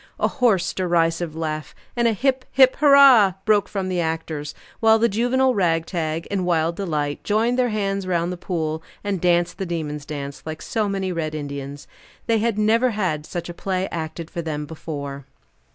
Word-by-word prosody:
A - - +3
hoarse, 220 -9 +1
derisive 170 -2 0
laugh, 155 -2 -4 0.2
and 235 -1 +2
a 230 - +2
hip, 260 +4 0
hip, 260 -1 +5
hurrah! 275 -9 +7
broke 210 -2 +3
from 195 -2 -3
the 180 -2 0
actors; 160 -2 -3 0.2
while 225 0 +5
the 230 +1 +3
juvenile 245 +4 +2
ragtag, 165 -3 -1
in 195 -2 0
wild 170 -1 +1
delight, 150 -7 -2
joined 230 +4 +1
their 250 -1 +2
hands 195 -3 -2
round 175 -1 0
the - - -3
pool, 160 -3 -3 0.2
and 200 -4 -2
danced 175 0 +1
the 190 - -2
demon's 150 -4 -4
dance, 140 -2 -6
like 155 0 -6
so 215 -2 -1
many 195 -1 -2
red 155 -3 -3
Indians. 140 -1 -6 0.4
They 225 -1 +2
had 225 -1 0
never 225 +4 +3
had 180 -9 -2
such 175 -1 -5
a 175 - -6
play 190 +1 -2
acted 160 0 -5
for 170 - -3
them 150 -2 -4
before. 145 -3 -6
175 Hz, 180 wpm, -22 LUFS, 160-215 Hz, 0.4 s, hurrah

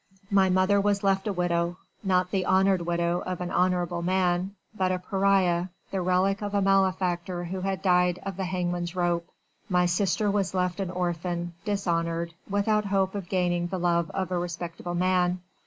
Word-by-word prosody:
My 195 -1 +4
mother 185 +2 +3
was 200 0 +1
left 195 +1 +1
a - - +1
widow 175 -1 0 0.3
not 185 -2 +1
the 190 -2 +1
honoured 190 -1 +3
widow 170 0 +1
of 185 -1 -4
an 180 -1 -4
honourable 180 -1 +1
man 180 +1 0 0.2
but 185 -2 +1
a 185 - +1
pariah, 185 -2 +2 0.2
the 190 - -1
relict 185 +2 +1
of 205 0 -3
a 200 - +3
malefactor 185 -2 +1
who 185 +2 -4
had 190 0 -2
died 180 -1 +3
of 195 -1 -4
the 190 0 -3
hangman's 175 -1 -2
rope 175 -1 0 0.4
my 180 -1 +3
sister 195 +3 +1
was 195 -2 -1
left 180 0 0
an 190 -2 -2
orphan 175 -1 -2
dishonoured 170 -4 -1 0.2
without 210 +1 +1
hope 195 -1 +1
of 195 -4 -5
gaining 175 -2 +1
the 185 - -3
love 170 -1 +1
of 190 -1 -3
a 180 - +1
respectable 175 0 -5
man. 180 0 +2
180 Hz, 175 wpm, -27 LUFS, 175-195 Hz, 0.4 s, My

